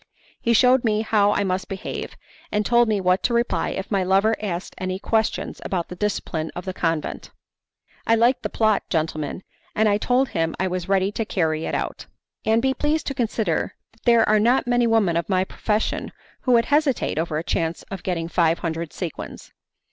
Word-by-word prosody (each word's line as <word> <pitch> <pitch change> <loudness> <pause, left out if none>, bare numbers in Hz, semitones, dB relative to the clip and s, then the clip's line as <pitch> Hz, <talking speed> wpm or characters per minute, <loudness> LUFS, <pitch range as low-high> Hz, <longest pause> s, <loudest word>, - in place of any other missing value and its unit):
He 235 - +2
shewed 250 +2 +5
me 215 -2 +1
how 205 -2 +3
I 205 - +1
must 185 -1 -1
behave, 195 -1 -5 0.3
and 210 0 0
told 240 +1 +4
me 215 -2 +1
what 185 0 +2
to 240 - +1
reply 235 +1 +1
if 195 +2 -5
my 195 -2 +2
lover 195 +4 +3
asked 185 -4 -4
any 185 0 -2
questions 220 +2 -1
about 175 -3 -2
the 180 - -7
discipline 175 -5 -2
of 180 - -6
the 185 - -3
convent. 165 -4 -2 0.8
"I 230 - +5
liked 235 +3 +3
the - - -3
plot, 220 -2 +2
gentlemen, 155 +1 -2 0.3
and 220 0 +3
I 205 0 +2
told 250 +3 +2
him 165 0 -1
I 190 - +1
was 180 0 -4
ready 195 0 +2
to 225 - -2
carry 160 -6 -1
it - - -2
out. - - -4 0.4
And 225 +2 +2
be 265 0 +2
pleased 300 +3 0
to - - -3
consider 220 - -1 0.2
that 225 - -29
there 235 -2 +5
are 215 0 +4
not 240 +5 +3
many 245 -1 +2
women 210 -7 +2
of 170 - -2
my 185 -1 +2
profession 210 +3 -2 0.3
who 250 - +2
would 230 -1 +4
hesitate 290 - +1
over 160 -2 -1
a 160 - -2
chance 165 0 -2
of 195 -2 -5
getting 170 -3 -2
five 165 -1 +2
hundred 165 -1 -4
sequins. 175 -5 -7
200 Hz, 200 wpm, -23 LUFS, 175-230 Hz, 0.8 s, shewed